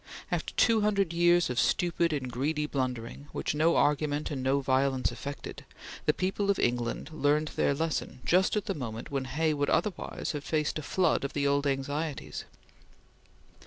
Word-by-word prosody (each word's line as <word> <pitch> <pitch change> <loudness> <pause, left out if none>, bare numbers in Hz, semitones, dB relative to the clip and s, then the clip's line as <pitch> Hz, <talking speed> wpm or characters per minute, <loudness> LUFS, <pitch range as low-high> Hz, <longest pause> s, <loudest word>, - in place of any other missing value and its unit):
After - - -1
two 225 -2 +4
hundred 200 -4 +1
years 175 +1 +4
of 125 - 0
stupid 170 +2 +2
and 135 -4 -2
greedy 150 +5 -1
blundering, 130 -1 -3
which - - -1
no 160 +3 +3
argument 150 0 +1
and 135 -3 -3
no 135 +2 +2
violence 135 0 +1
affected, 140 0 -7 0.4
the - - +7
people 195 +2 -1
of 200 - +3
England 120 +4 -1
learned 150 0 +2
their 140 - +1
lesson 160 -4 -2
just 185 +4 +3
at 210 - -1
the - - -1
moment 120 0 -6
when 135 -2 -1
Hay 155 +4 0
would 145 -1 0
otherwise 210 -4 -1
have 145 -2 -5
faced 155 0 -1
a - - -4
flood 170 +1 +1
of 140 - -3
the 140 -1 0
old 140 0 +2
anxieties. 140 +2 -3
145 Hz, 170 wpm, -29 LUFS, 135-165 Hz, 0.4 s, the